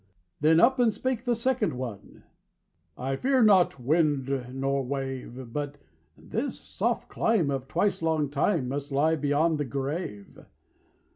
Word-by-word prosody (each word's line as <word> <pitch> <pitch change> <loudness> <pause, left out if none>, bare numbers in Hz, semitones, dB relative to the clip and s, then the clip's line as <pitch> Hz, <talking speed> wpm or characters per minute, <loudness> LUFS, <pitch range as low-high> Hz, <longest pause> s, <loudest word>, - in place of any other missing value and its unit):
Then 160 +2 +5
up 260 +5 +4
and 240 -2 +4
spake 255 +2 -3
the 240 -1 +2
second 235 -1 0
one: 120 -5 -7 0.7
"I 135 +2 -2
fear 260 - +2
not 190 -9 +4
wind 140 -2 +1
nor 135 +1 -1
wave; 130 -2 -5
But 145 -1 -3 0.4
this - - -4
soft - - -2
clime 195 -11 +1
of 135 -1 -3
twice 195 +6 0
long 160 -3 0
time 145 -1 +1
Must 140 +2 -4
lie 155 +4 +3
beyond 150 +2 +1
the 145 - 0
grave. 135 - -5
145 Hz, 140 wpm, -27 LUFS, 135-180 Hz, 0.7 s, Then